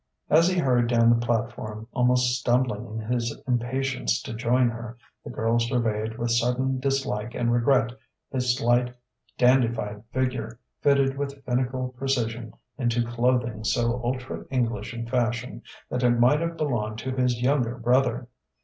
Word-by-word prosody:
As 165 +3 +6
he 185 0 +1
hurried 125 -7 +2
down 115 -1 +4
the 120 0 +2
platform, 115 -2 -3
almost 125 0 +3
stumbling 120 -3 0
in 110 0 -5
his 120 -1 -2
impatience 125 - 0
to - - -6
join 120 +2 +2
her, 115 0 -6 0.3
the - - -8
girl 115 +1 0
surveyed 115 -2 -1
with 120 0 -1
sudden 125 +3 +1
dislike 130 -5 -2
and 120 -1 +1
regret 120 0 +3 0.4
his 125 -2 +1
slight, 125 0 +1 0.4
dandified 115 -5 +2
figure 125 -3 -2 0.2
fitted 140 -1 +3
with 140 -1 -5
finical 130 0 -1
precision 120 -3 -2 0.3
into 120 -1 +1
clothing 120 -2 0
so 120 +2 0
ultra 125 +1 -3
English 125 -2 -1
in 115 -1 -5
fashion 120 0 -1 0.3
that 125 - -1
it 120 -1 +3
might 130 +5 +5
have 170 0 -3
belonged 115 -8 -1
to 130 +3 -4
his 125 -2 +1
younger 125 -2 +1
brother. 120 0 +1
120 Hz, 150 wpm, -25 LUFS, 115-130 Hz, 0.4 s, As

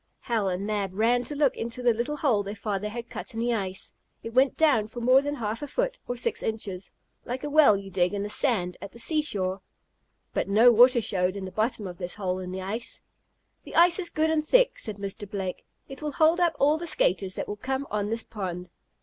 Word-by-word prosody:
Hal 225 -5 0
and 185 +2 -3
Mab 200 -3 -2
ran 235 +4 +2
to 295 - -6
look 285 -3 +2
into 235 +2 -5
the 240 -1 +4
little 240 +7 -3
hole 250 -9 +2
their 200 +1 -6
father 210 0 -3
had 235 +2 -6
cut - - -7
in - - -3
the 240 +1 +1
ice. 190 -4 -4 0.3
It 230 - -7
went 260 +2 +3
down 275 -10 +3
for 230 +2 -8
more 255 +3 +5
than 290 +1 -3
half 225 -2 -3
a 290 - -4
foot, - - -2
or 245 - -3
six 235 - -1
inches, 200 -4 -4 0.3
like 250 +2 -5
a 295 - -4
well 285 -9 +6
you 195 0 -9
dig 180 +2 +1
in 200 - -2
the - - -3
sand 210 -6 0
at 200 0 -8
the - - -12
seashore. 205 - -1 0.7
But - - -1
no 220 +5 +6
water 240 +1 +6
showed 185 -2 0
in 195 -1 -5
the 185 - -7
bottom 220 0 -1
of 180 -2 -8
this 175 -1 -3
hole 185 -3 -2
in 180 -1 -6
the 190 0 -5
ice. 220 +5 -5 0.6
"The - - -11
ice 345 +2 +6
is 350 -2 0
good 315 0 +1
and 310 -1 +1
thick," - - +3
said 215 -3 -4
Mr. 200 0 -6
Blake. 190 -3 -4 0.2
"It 270 +1 -10
will 300 -1 -3
hold 320 +4 +4
up 340 -3 +2
all 295 +3 +3
the 340 - -5
skaters 185 - +1
that - - -4
will 205 - -5
come 265 +5 -3
on 210 -1 -1
this 225 0 -1
pond." 180 -4 -6
225 Hz, 235 wpm, -27 LUFS, 195-270 Hz, 0.7 s, well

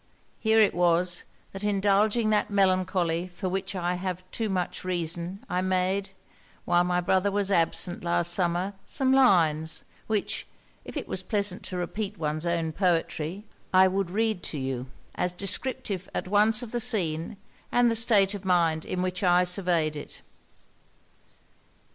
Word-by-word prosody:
Here 220 0 +3
it 210 -2 +4
was, 175 0 +1 0.3
that 195 +1 -8
indulging 210 +2 +2
that 210 - +2
melancholy 185 -3 +1
for 185 +2 -6
which 190 +1 -3
I 175 -1 -1
have 185 -1 -4
too 225 -2 -2
much 185 -2 -2
reason, 175 +1 -3
I 180 - -1
made, 185 +1 0 0.6
while 175 0 +3
my 180 0 0
brother 190 +3 +1
was 200 0 0
absent 175 0 +1
last 175 0 +2
summer, 180 +2 +1
some 265 -1 +2
lines, 160 - +3 0.2
which, 215 -2 -2 0.4
if - - -7
it - - -4
was - - -3
pleasant 200 -4 0
to 185 - -4
repeat 205 +3 -4
one's 155 +1 -2
own 165 -1 0
poetry, 175 +1 -1 0.3
I 185 0 +6
would 190 -1 -1
read 215 0 0
to 155 - -4
you, 130 -1 -3 0.3
as 180 0 -1
descriptive 200 0 -3
at - - -2
once 215 +5 +3
of 230 - -8
the 240 - -1
scene, 190 -6 -1 0.3
and 245 -1 +4
the - - 0
state 210 -3 +4
of 200 -2 -6
mind 170 -4 +1
in 180 0 -2
which 185 -1 -2
I 180 -1 +4
surveyed 175 -4 +1
it.' 145 - -10
185 Hz, 155 wpm, -27 LUFS, 175-205 Hz, 0.6 s, I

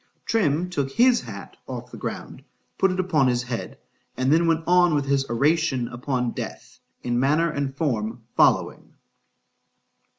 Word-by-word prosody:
_ - - -46
Trim 175 -6 +1
took 140 -5 -1
his 245 - +4
hat - - -10
off - - -7
the - - -9
ground,—put 195 - -4
it 185 - -3
upon 160 -7 +2
his 125 -1 +1
head,—and 130 +2 -4
then 165 +1 +3
went 165 0 +1
on 175 -2 +4
with 145 -1 0
his 140 -1 0
oration 140 0 +1
upon 125 0 -2
death, - - -8 0.2
in 120 0 0
manner 155 +5 +2
and 140 -2 -3
form 115 -6 -2
following. - - +2
140 Hz, 145 wpm, -24 LUFS, 125-170 Hz, 0.2 s, his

